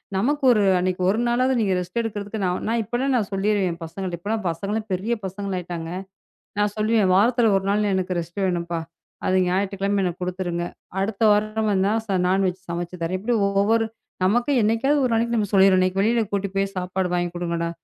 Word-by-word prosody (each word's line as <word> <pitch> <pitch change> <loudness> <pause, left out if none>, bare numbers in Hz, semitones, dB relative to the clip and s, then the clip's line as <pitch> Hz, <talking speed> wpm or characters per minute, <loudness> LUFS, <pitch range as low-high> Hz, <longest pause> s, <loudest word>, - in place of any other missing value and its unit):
நமக்கு 275 +9 0
ஒரு 215 -3 +3 0.2
அன்னைக்கு 185 0 -1
ஒரு 210 +4 +1
நாளாவது 255 +2 +2
நீங்க 200 -4 +1
ரெஸ்ட் 180 +6 -3
எடுக்குறதுக்கு 210 -1 -4 0.3
நான் 230 +1 +1
இப்பனா 250 +4 0
சொல்லிருவேன 195 -3 0
பசங்கட்ட. 175 +2 -5
இப்பலா 215 +5 -2
பசங்க 200 +6 -2
பெரிய 200 +6 -1
பசங்களாயிட்டாங்க. 180 -4 -4 0.7
நான் 205 0 +1
சொல்லுவேன். 215 -1 +2
வாரத்துல 230 +2 +4
ஒரு 195 - -4
நாள் 205 0 +1
எனக்கு 185 -1 -1
ரெஸ்ட் 170 +4 -5
வேணும்ப்பா. 170 -2 -1 0.5
அது 185 - +2
ஞாயிற்றுக்கிழமை 195 +2 0
எனக்குக் 180 -1 -3
குடுத்துருங்க. 180 -1 -2 0.4
அடுத்த 200 +2 -2
வாரம் 215 +1 +1
வேணுனா 195 +1 +2
ச 195 -2 +1
நான்வெஜ் 190 0 +1
சமைச்சுத் 175 +1 -5
தரேன். 175 +3 -1
இப்படி 235 +5 0
ஒவ்வொரு 210 +3 +2 0.4
நமக்கே 240 +8 +2
என்னைக்காவது 245 +7 +2
ஒரு 240 - 0
நாளைக்கு 235 +1 +1
நம்ம 205 -2 0
சொல்லிருவேன். 190 -1 +6
இன்னைக்கு 185 +1 +1
வெளியில 230 +2 +2
கூட்டிட்டு 200 -1 -2
போய் 195 0 -1
சாப்பாடு 185 0 -2
வாங்கி 175 0 -1
குடுங்கடா. 170 -1 -2
195 Hz, 170 wpm, -23 LUFS, 180-220 Hz, 0.7 s, சொல்லிருவேன்